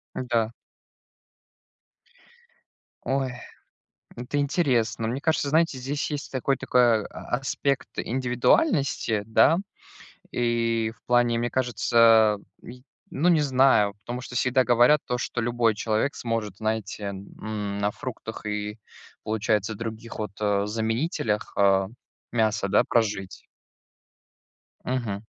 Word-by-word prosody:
Да. 115 -3 0 2.5
Ой, 135 -1 -1 0.8
это 125 +4 -3
интересно. 130 -7 +1
Мне 130 +4 -3
кажется, 155 -2 0
знаете, 160 -2 +2
здесь 140 +4 -3
есть 145 -1 -5
такой 135 +1 0
такой 120 -4 +3
а 120 - -4
аспект 135 +1 -1
индивидуальности, 130 - +1
да. 115 +9 +4 0.7
И 115 -2 0
в - - -36
плане, 120 -1 +3
мне 120 +1 -1
кажется, 120 -2 -1
а, 110 -2 +6 0.3
й 125 +1 -11 0.3
ну, 155 +6 +1
не 165 -4 +5
знаю, 130 -7 +4
потому 125 +1 -4
что 125 - -9
всегда 130 +1 +3
говорят 125 +5 +4
то, 125 -1 -1
что 120 0 -3
любой 120 -2 +1
человек 110 +6 0
сможет, 115 -4 -3
знаете, 110 -1 -3
м, 100 +1 -5
на 105 0 0
фруктах 110 -4 -7
и, 105 +1 -4 0.4
получается, 110 -1 0
других 115 +1 -7
вот, 105 -3 -4
э, 100 -1 +1
заменителях, 110 +1 -1
а, 95 -1 +4 0.4
мяса, 110 -4 +1
да, 100 - +4
прожить. 105 -5 -1 1.4
Мгм. 115 -5 -3
115 Hz, 115 wpm, -25 LUFS, 110-130 Hz, 2.5 s, а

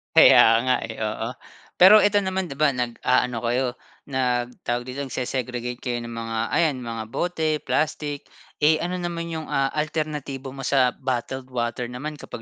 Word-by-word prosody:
Kaya - - +9 0.2
nga 130 - +3
eh, 110 - -8
oo. 110 +1 -2 0.5
Pero 205 +4 +9
ito 205 0 +3
naman, 190 -2 -2
'di 135 - -7
ba? 150 -2 +4
Nag-aano 125 0 0
kayo, 125 +2 +1 0.4
nag 125 -2 0
tawag 120 0 -1
dito? 140 +2 -4
Nagse-segregate 125 -1 -3
kayo 120 -1 -2
ng 120 - -7
mga 115 -1 -4
ayan, 160 -5 +2
mga 115 -1 -4
bote, 160 +5 -1
plastic, 145 -1 -1 0.3
eh, 155 +1 +4
ano 180 +1 -2
naman 170 -1 -4
'yong, 160 -1 -5
ah, 135 0 +1
alternatibo 150 -3 -3
mo 135 0 -7
sa 130 -2 +4
bottled 130 0 -3
water 120 0 -2
naman 145 +5 -6
kapag 115 - -8
130 Hz, 165 wpm, -24 LUFS, 120-155 Hz, 0.5 s, Kaya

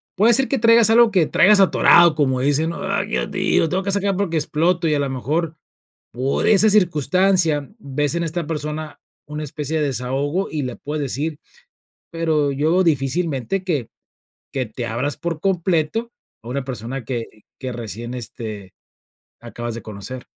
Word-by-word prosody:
"Puede 215 +5 +4
ser 270 +3 +4
que 275 - 0
traigas 230 -1 +5
algo 230 0 +5
que 180 -5 +3
traigas 210 +1 +5
atorado", 175 -3 +5
como 130 -4 +1
dicen, 145 +4 +1
¿no? 170 - -6
"¡Ay, 195 +1 -1
Dios 215 - -2
mío!, 190 -2 +1
lo 165 - 0
tengo 185 +3 -1
que 200 - -1
sacar 200 0 0
porque 180 -4 -1
exploto", 165 +3 +1
y 155 - +2
a 145 - +1
lo 140 -1 -1
mejor 155 +5 -2 0.5
por 130 +4 -1
esa 215 0 +5
circunstancia 175 -4 +2
ves 145 -1 -2
en 170 - -1
esta 165 0 -3
persona 150 0 -5 0.3
una 150 +1 -5
especie 150 +2 -3
de 150 - +1
desahogo 140 +8 -2
y 150 -2 -2
le 125 - -4
puedes 150 0 -4
decir, 145 +3 -3 0.7
pero 160 -3 0
yo 155 +7 +2
difícilmente 155 +2 -1
que 150 - -2 0.7
que 130 -2 -2
te 120 +2 -5
abras 125 +6 -2
por 170 -2 -4
completo 185 +4 0 0.3
a 115 - -11
una 135 +2 -3
persona 125 0 -5
que 120 0 -3 0.3
que 130 -1 -5
recién, 115 0 -6
este, 110 -5 -7 0.7
acabas 120 -1 -6
de 115 - -6
conocer. 110 +5 -7
155 Hz, 170 wpm, -20 LUFS, 130-180 Hz, 0.7 s, traigas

